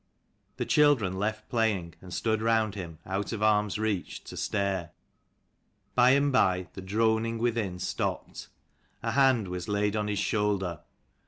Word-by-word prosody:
The - - -2
children 125 -11 +3
left 110 +1 -2
playing, 105 -8 0
and 90 - -11
stood 110 +3 0
round 110 -2 +2
him 85 -5 -7
out 95 +1 -3
of 110 -2 -3
arm's 105 -1 +2
reach, 105 -4 -2
to - - -9
stare. 100 -4 -1 1.0
By 125 0 +5
and 140 0 +2
by 95 -8 +2
the 95 - -8
droning 110 +3 +1
within 115 -6 -1
stopped. 90 - -3 0.6
A - - 0
hand 130 -7 +3
was 90 -1 -5
laid 105 0 +1
on 105 -1 -1
his 105 -1 -1
shoulder. 100 -5 0
105 Hz, 150 wpm, -28 LUFS, 95-115 Hz, 1.0 s, By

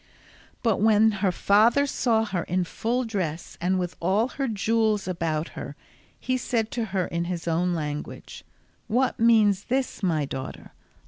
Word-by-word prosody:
But 225 -5 +1
when 220 0 +5
her 195 -3 +3
father 220 +9 +4
saw 230 -5 +1
her 185 -5 -2
in 180 +1 0
full 235 +8 -1
dress 180 -8 -4
and 185 +2 +1
with 180 -1 -3
all 200 +8 +1
her 275 0 -3
jewels 220 -1 +1
about 165 -3 -2
her, - - -8 0.4
he 255 0 -1
said 230 -3 -1
to 235 -2 -2
her 190 -3 -1
in 170 0 -2
his 175 -1 -4
own 175 +2 +1
language, 150 -2 -6 0.4
"What 250 +4 +1
means 215 -4 +4
this, 260 -2 -1
my 160 -6 +1
daughter? 135 -1 -7
200 Hz, 155 wpm, -25 LUFS, 175-225 Hz, 0.4 s, when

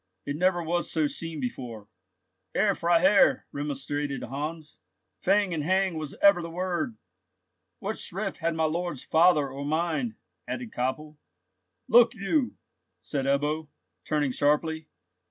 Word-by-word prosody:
"It 145 - -2
never 175 +1 +2
was 175 +2 -1
so 160 -2 +2
seen 160 +1 -3
before, 120 -4 -5 0.7
Herr 200 0 +3
Freiherr," 175 +3 +4
remonstrated 145 0 -3
Heinz; 150 +4 -5 0.4
"fang 195 -1 +2
and 155 -3 -1
hang 190 +1 +2
was 155 -2 -5
ever 200 -3 +7
the 170 - -5
word." 175 -9 -2 0.8
"What 210 +3 -4
shrift 195 +2 -4
had 165 -1 -1
my 160 - 0
lord's 170 -2 -1
father, 160 -3 +4
or 135 +2 -6
mine?" 170 - -1 0.3
added 245 -3 -5
Koppel. 150 +5 -3 0.7
"Look 235 +1 +6
you!" 245 +7 0 0.5
said 140 -3 -2
Ebbo, 150 +3 0 0.4
turning 150 -3 0
sharply. 150 +3 +1
160 Hz, 130 wpm, -27 LUFS, 145-185 Hz, 0.8 s, ever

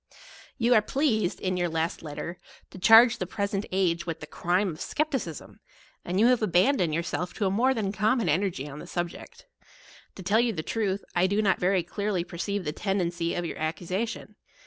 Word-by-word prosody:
You 240 -1 +3
are 215 - +6
pleased, 220 - 0
in 185 -1 -1
your 175 -1 0
last 165 +1 -2
letter, 165 +3 -6 0.3
to 185 - -10
charge 225 +5 +7
the 185 - -2
present 200 0 -2
age 180 -2 0
with 165 -1 -3
the 150 - -7
crime 180 +5 0
of 155 - -10
skepticism; 270 - -3 0.4
and 180 +2 -1
you 220 - +5
have 250 -1 +4
abandoned 185 - +3
your 170 - 0
self 180 +1 -4
to 210 - -1
a 190 - +1
more 255 +6 +2
than 205 -4 -1
common 215 +2 +1
energy 170 -3 0
on 145 +1 -8
the 175 - -9
subject. 175 -1 -6 0.7
To 190 - -9
tell 205 +5 +3
you 240 -1 +2
the 160 -4 -4
truth, 200 -2 -1
J 175 +1 +4
do 200 +2 0
not 195 -2 +2
veiy 180 -1 +1
clearly 200 -1 -2
perceive 185 +3 -4
the 150 - -1
tendency 175 -3 -1
of 175 - -2
your 165 - -5
accusa 175 +7 -2
tion. - - -9
190 Hz, 200 wpm, -27 LUFS, 170-215 Hz, 0.7 s, charge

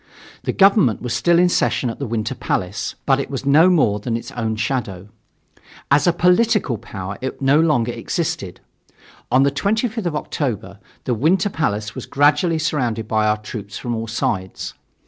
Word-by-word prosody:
The - - +1
government 195 - +4
was 125 - -2
still 170 -1 +3
in 180 +1 +5
session 155 -6 +1
at - - -10
the 140 - -3
Winter 115 +2 -2
Palace, 95 -5 -3
but 135 -1 +3
it 140 - -3
was 135 0 -5
no 155 +6 +6
more 135 - +3
than 115 +2 -2
its 115 - -8
own 110 -2 -2
shadow. 105 -4 -3 0.8
As 140 +2 +4
a - - +6
political 180 - +2
power 100 -3 -7
it 130 0 -4
no 140 +2 +3
longer 145 -8 +2
existed. 115 - -4 0.7
On 130 +1 +5
the 140 - +2
25th 220 - -1
of 160 - -2
October 110 -10 -3 0.2
the 125 - -1
Winter 170 - +2
Palace 110 - -2
was - - -7
gradually 150 +4 +3
surrounded 120 -8 -1
by 110 -1 +1
our 105 0 +2
troops 105 -1 -8
from 120 - -4
all 115 0 -3
sides. 95 -4 -3
130 Hz, 175 wpm, -20 LUFS, 110-160 Hz, 0.8 s, no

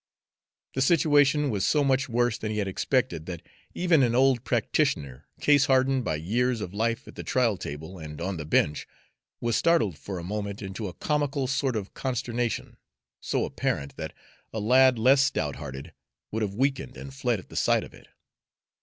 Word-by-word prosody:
The 130 - -1
situation 145 -1 +4
was 100 -3 -1
so 150 -1 +3
much 135 -1 +1
worse 120 0 +1
than 110 - -3
he 105 - -3
had 100 -2 0
suspected 80 - 0
that 85 -3 -6 0.3
even 175 -5 +3
an 120 -2 +2
old 130 -2 +3
practitioner, 90 - -1
case 145 -2 +4
hardened 130 0 +3
by 80 - -1
years 115 +10 0
of 95 -3 -5
life 115 +2 -1
at - - -10
the - - -7
trial 120 -5 +2
table 80 +3 -7
and 75 -2 -8
on 90 +2 -3
the 75 - -5
bench, 75 -1 +1 0.5
was 120 -1 0
startled 165 - +2
for 95 -2 -6
a 85 - -6
moment 100 +2 -4
into 100 +2 -5
a 90 - -7
comical 145 -2 0
sort 135 -1 0
of 105 -2 -4
consternation, 120 -2 -2 0.4
so - - -1
apparent 70 0 -2
that - - -5 0.4
a 110 - -3
lad 130 +3 +5
less 130 +4 +5
stout 80 - 0
hearted 70 +3 -8 0.4
would 110 - -2
have 100 -2 -2
weakened 135 +1 -1
and 135 - -9
fled 125 -4 0
at 95 - -12
the - - -12
sight - - +2
of - - -12
it. - - -16
120 Hz, 185 wpm, -27 LUFS, 95-135 Hz, 0.5 s, lad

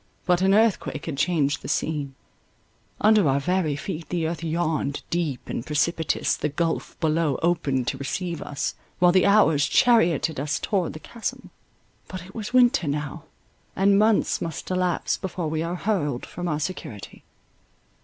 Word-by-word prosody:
But 180 0 +2
an 195 +1 +4
earthquake 215 -8 +1
had 160 - -3
changed 145 -2 +1
the - - -8
scene—under 155 +6 -1
our 135 +1 +2
very 175 -1 0
feet 160 +2 -6
the 170 -2 -1
earth 165 0 -4
yawned—deep 160 -2 -2
and - - -3
precipitous 160 +3 0
the 150 - -2
gulph 165 +3 -2
below 155 -3 +1
opened 145 -7 +1
to 135 - -5
receive 170 +4 -3
us, 140 - -3 0.2
while 180 0 +5
the 185 +1 +4
hours 160 -8 +4
charioted 170 - +3
us 145 +2 -1
towards 190 -5 -1
the - - -7
chasm. 230 +7 -6 0.6
But 185 -2 -7
it 190 - -14
was 220 0 -5
winter 250 - +4
now, 145 0 -3 0.5
and 195 +1 +4
months 215 0 +2
must 165 +2 -5
elapse 180 -1 0
before 180 -4 -4
we 155 0 -1
are 170 +2 -2
hurled 165 - -1
from 175 0 -6
our 150 -3 -1
security. 155 - -6
165 Hz, 155 wpm, -24 LUFS, 150-185 Hz, 0.6 s, while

